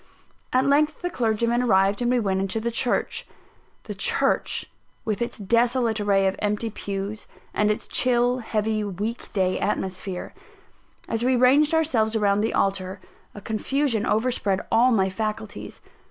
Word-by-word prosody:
At 255 +1 +2
length 300 +4 +2
the 355 - -1
clergyman 235 -2 +1
arrived, 200 -2 +3
and 240 - +1
we 250 0 +3
went 190 -3 0
into 195 +3 -1
the 235 +2 -2
church 240 +1 -1 0.6
the - - -6
church, - - 0 0.4
with 215 0 -2
its 235 - -3
desolate 230 +2 +1
array 200 -1 +2
of 190 0 +1
empty 210 +2 -1
pews, 200 +1 -5 0.3
and 210 0 +2
its 210 - -2
chill, 245 0 +2
heavy, 215 -2 -1
week 205 +4 -4
day 185 -2 0
atmosphere. 190 -2 -3 0.7
As 225 +1 -2
we 255 +1 +3
ranged 280 +6 +4
ourselves 235 -9 +1
round 205 -1 +2
the 225 - 0
altar, 190 -1 -1 0.4
a 205 - -8
confusion 225 +2 0
overspread 215 -4 +1
all 245 +3 +5
my 195 -5 +3
faculties. 215 +2 -5
220 Hz, 150 wpm, -24 LUFS, 200-245 Hz, 0.7 s, all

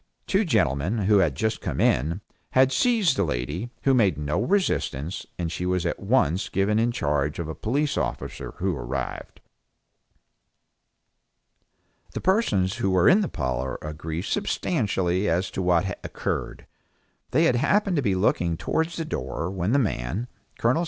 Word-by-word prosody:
Two 195 +3 +2
gentlemen, 90 - +1
who 100 +1 +4
had 80 -8 +2
just 110 +9 -1
come - - -3
in, 80 +10 +2 0.3
had 130 0 +5
seized 210 - +3
the 100 - +1
lady, 75 - -3
who 135 - +4
made 100 - +3
no 75 +6 -1
resistance, 100 - -1
and 85 -2 -2
she 90 - -4
was 90 -1 0
at - - -1
once 90 +6 +1
given 100 +3 +1
in 120 +1 +2
charge 75 - -1
of 85 - -3
a 80 - -4
police 140 - -1
officer 60 -1 -4
who 95 -1 -1
arrived. - - -5 2.7
The - - -3
persons 105 - +2
who 95 - 0
were 95 -2 +4
in 195 +4 +6
the 195 - 0
parlor 65 -1 -2
agree 80 +2 -4
substantially 95 -1 0
as 90 +3 0
to - - -3
what 90 -1 +3 0.2
occurred. - - -4 0.6
They 155 +6 +3
had 125 -7 +3
happened 195 - +2
to - - +2
be 100 -7 +1
looking 85 -3 +1
towards 160 - -1
the 165 - -3
door 65 - -3
when 95 +1 -1
the 140 - +4
man 105 - -1 0.3
Col. 120 +7 +2
95 Hz, 160 wpm, -25 LUFS, 80-125 Hz, 2.7 s, in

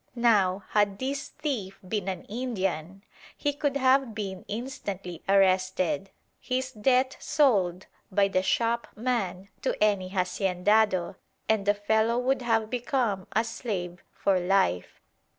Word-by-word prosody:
Now, 200 -5 +3
had 205 -2 +2
this 275 +3 -3
thief 225 -11 -4
been 205 -1 -2
an 190 -1 -3
Indian, 195 -6 -3 0.3
he 290 -1 0
could 285 -1 -1
have 260 -3 +3
been 195 -4 -5
instantly 200 -7 -5
arrested, 185 -3 +2 0.3
his 255 0 -2
debt 255 +3 +2
sold 200 - +2 0.3
by 200 +1 +3
the 185 -1 +1
shopman 230 -3 -1
to - - 0
any 200 -3 +2
haciendado, 190 +1 +1 0.3
and 215 -2 +1
the 205 - +4
fellow 220 +3 +1
would 255 +2 +1
have 225 -2 +1
become 240 -6 -1
a 220 - +3
slave 195 -7 -5
for 195 -2 +1
life. 180 - +1
205 Hz, 125 wpm, -27 LUFS, 185-245 Hz, 0.3 s, the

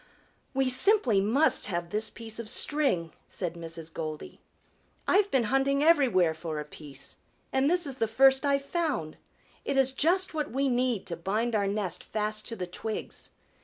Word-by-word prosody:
"We 270 -1 +2
simply 255 - +4
must 245 +10 +2
have 175 -3 -3
this 215 +1 -1
piece 225 -1 -7
of 225 -2 -5
string," 260 - 0
said 175 -3 -4
Mrs. 165 -1 -8
Goldy. 155 -2 -6 0.7
"I've 405 +1 +4
been 265 -8 +2
hunting 270 +4 +1
everywhere 245 - +4
for 160 -1 -5
a 150 - -5
piece, 145 -2 -6 0.4
and 265 +2 +3
this 355 0 +3
is 270 -2 -5
the 225 - +1
first 265 +4 +5
I've 280 -1 +1
found. 290 - -2 0.5
It 275 - -1
is 265 -1 +3
just 350 +7 +1
what 300 -2 -2
we 270 +2 0
need 245 -4 0
to 170 - -4
bind 210 +8 -1
our 205 -2 +1
nest 195 -3 -2
fast 215 0 -3
to 230 - -4
the 185 - -4
twigs. 215 +5 -5
230 Hz, 170 wpm, -28 LUFS, 180-275 Hz, 0.7 s, first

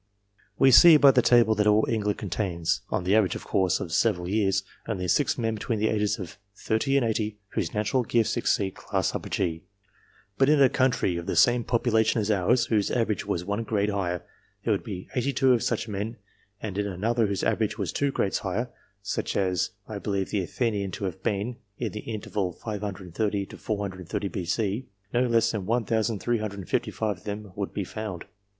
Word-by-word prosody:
We 135 - +6
see 165 +5 +9
by 140 -2 +7
the 125 - +4
table 120 -2 +5
that 105 0 +1
all 105 +1 +4
England 105 -2 0
contains 90 -4 -1
(on - - -1
the 95 +3 +2
average, 105 -6 +3
of - - -6
course, 95 -3 +1
of - - -5
several 90 0 +1
years) 100 -1 +1 0.2
only 95 -5 -2
six 145 +9 +2
men 115 -2 0
between 110 +1 -2
the 110 +1 +1
ages 105 -1 +1
of 95 0 -8 0.2
thirty 135 +7 0
and 130 - +2
eighty, 110 -2 -1
whose - - -3
natural 105 +5 +1
gifts 115 -1 +1
exceed 95 -2 +1
class - - -2
G; 85 -3 -1 0.8
but 135 +1 +5
in 150 -1 +5
a 135 -2 +6
country 125 -9 +1
of 85 - -6
the - - -1
same 120 -1 +4
population 115 -1 +2
as 110 0 0
ours, 105 +5 +3
whose 105 -3 +1
average 110 -5 -1
was 90 0 -2
one 100 +3 -1
grade 105 -2 0
higher, 90 -3 -2 0.4
there - - 0
would - - -2
be 90 - -6
eighty 135 +2 0
two 130 -1 +4
of 120 - +1
such - - -1
men; 105 +2 -4 0.4
and 100 -2 -4
in 100 - 0
another 110 +4 0
whose 100 -1 -2
average - - 0
was - - -2
two 140 -1 +1
grades 100 - 0
higher 110 +6 -2 0.3
(such 105 - -2
as 95 -3 +1 0.2
I - - -5
believe 100 -2 -2
the 100 - +1
Athenian 100 +2 -1
to 100 - -4
have 95 0 -5
been, 105 +5 -2 0.2
in 115 -3 -3
the 105 - -6
interval 105 -4 -3
530 100 0 -3
430 100 -1 -3
B.C.) 100 +6 -2 0.3
no 125 +1 +2
less 115 -1 +3
than 100 -4 -4
1,355 110 -3 -1
of - - -23
them 105 -1 -6
would 100 -1 -3
be 100 - -3
found. 105 -2 -6
105 Hz, 190 wpm, -26 LUFS, 95-115 Hz, 0.8 s, see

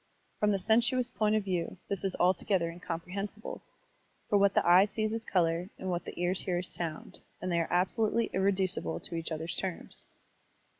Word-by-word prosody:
From 210 - +3
the 200 - +3
sensuous 235 +5 +2
point 215 0 +2
of 215 - +1
view, 185 -2 -2
this 200 -1 -3
is 195 -1 -1
altogether 180 -1 +2
incomprehensible, 180 +5 -5 0.7
for 205 - +3
what 200 0 +4
the - - +3
eye 180 +3 +8
sees 215 +1 -1
is 225 0 -2
color 175 -1 +1
and 185 - -3
what 175 0 -2
the - - -7
ears 180 +1 +1
hear 180 -2 -1
is 180 +1 -4
sotmd, 165 -3 -5 0.2
and 185 - -3
they 170 - +2
are 165 - -1
absolutely 215 +5 +1
irreducible 190 - +1
to - - -6
each 165 0 -3
other's 160 +1 -3
terms. 185 - -3
185 Hz, 185 wpm, -31 LUFS, 175-205 Hz, 0.7 s, eye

